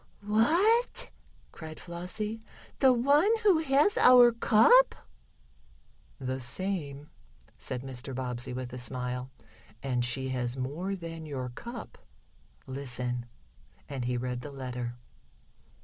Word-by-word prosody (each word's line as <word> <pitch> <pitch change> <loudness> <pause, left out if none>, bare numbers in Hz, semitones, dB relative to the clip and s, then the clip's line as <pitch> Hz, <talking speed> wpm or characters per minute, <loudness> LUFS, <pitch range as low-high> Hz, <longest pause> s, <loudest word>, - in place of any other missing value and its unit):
"What!" 345 - +2 0.4
cried 160 -1 -9
Flossie, 185 +6 -5 0.2
" - - -23
the 265 -2 +6
one 280 - +4
who 385 -6 +5
has 300 +5 +3
our 245 -1 +8
cup?" 235 - +5 1.2
"The 130 -1 -3
same," 150 0 -2 0.4
said 125 -1 -5
Mr. 130 0 -5
Bobbsey 125 0 -3
with 125 0 -5
a 125 - -5
smile. 125 0 -3 0.5
"And 125 -3 0
she 130 +2 0
has 125 -1 -2
more 155 +10 -3
than 165 -3 -8
your 130 -4 -4
cup. 235 - -9 0.7
Listen," 125 -2 -4 0.6
and 135 -3 -4
he 125 0 -1
read 125 0 -3
the 145 - -7
letter. 125 -3 -5
140 Hz, 115 wpm, -29 LUFS, -, 1.2 s, our